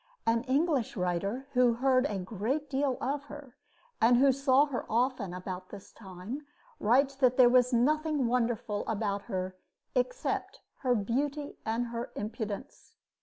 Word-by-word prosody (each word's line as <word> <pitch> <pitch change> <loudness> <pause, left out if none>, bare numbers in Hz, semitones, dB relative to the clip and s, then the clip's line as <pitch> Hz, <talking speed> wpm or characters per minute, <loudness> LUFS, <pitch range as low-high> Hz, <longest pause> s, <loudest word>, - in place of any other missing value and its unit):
An 230 0 +2
English 275 -3 +1
writer 195 +8 -1
who 250 -2 +4
heard 260 +2 +3
a 205 - -3
great 225 +10 -3
deal 270 -1 0
of 285 +2 -2
her 290 -4 -11 0.5
and 240 +2 +6
who 270 +2 +6
saw 275 +1 +4
her 275 -5 -4
often 240 -4 0
about 185 0 -6
this 200 -1 -11
time 210 +8 -8 0.3
writes 265 +6 +3
that 255 -2 +3
there 250 -2 +8
was 250 0 +4
nothing 300 +3 +2
wonderful 230 -3 0
about 205 -2 -1
her 185 0 -3 0.4
except - - -2 0.2
"her 250 -3 +2
beauty 280 +7 -2
and 230 +2 -1
her 235 0 -5
impudence." 215 +4 -6
245 Hz, 145 wpm, -30 LUFS, 210-275 Hz, 0.5 s, there